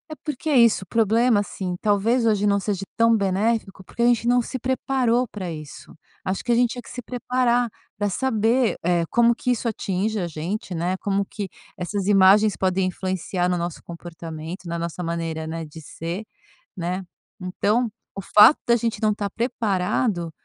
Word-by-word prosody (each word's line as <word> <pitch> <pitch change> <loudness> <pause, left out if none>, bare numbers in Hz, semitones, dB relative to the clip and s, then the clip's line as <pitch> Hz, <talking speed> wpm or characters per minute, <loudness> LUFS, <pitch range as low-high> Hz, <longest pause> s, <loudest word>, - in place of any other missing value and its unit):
É - - -5
porque 300 0 -3
é 285 - +4
isso, 230 -5 +5
o - - -16
problema, 225 +2 +3
assim, 190 -3 -3
talvez 215 +4 +2
hoje 210 -2 +2
não 200 -1 +3
seja 200 -1 -2 0.2
tão 230 0 +5
benéfico, 200 0 0
porque 235 - -7
a - - +5
gente 240 -1 +3
não 245 0 +4
se 255 +2 -5
preparou 255 -1 +1
para 195 -5 -6
isso. 155 -3 -10 0.3
Acho 190 +1 -2
que 240 - -1
a - - +4
gente 240 0 +3
tinha 245 - -5
que - - -14
se 250 - -6
preparar 245 0 0 0.3
para 205 0 0
saber, 230 +2 +1
eh, 170 0 +2
como 235 0 +4
que 250 +2 -1
isso 240 0 -1
atinge 210 0 -2
a 175 - -2
gente, 175 +4 -4
né, 175 +3 -1
como 200 0 -1
que 205 0 -5 0.3
essas 190 +2 -3
imagens 205 +1 +5
podem 190 0 +1
influenciar 185 -1 -2
no 180 0 0
nosso 170 -1 -4
comportamento, 170 0 -8
na 170 0 -3
nossa 170 +1 -4
maneira, 165 -2 -3
né, 165 +1 -4
de 155 +1 -11
ser, 170 +6 -6 0.5
né. 180 +1 -3 0.4
Então, 210 +6 0 0.3
o 195 - -4
fato 210 +8 +7
da 235 - +5
gente 230 -1 -2
não 215 -1 +3
estar 205 -1 -2
preparado, 195 -5 -1
205 Hz, 185 wpm, -23 LUFS, 180-235 Hz, 0.5 s, fato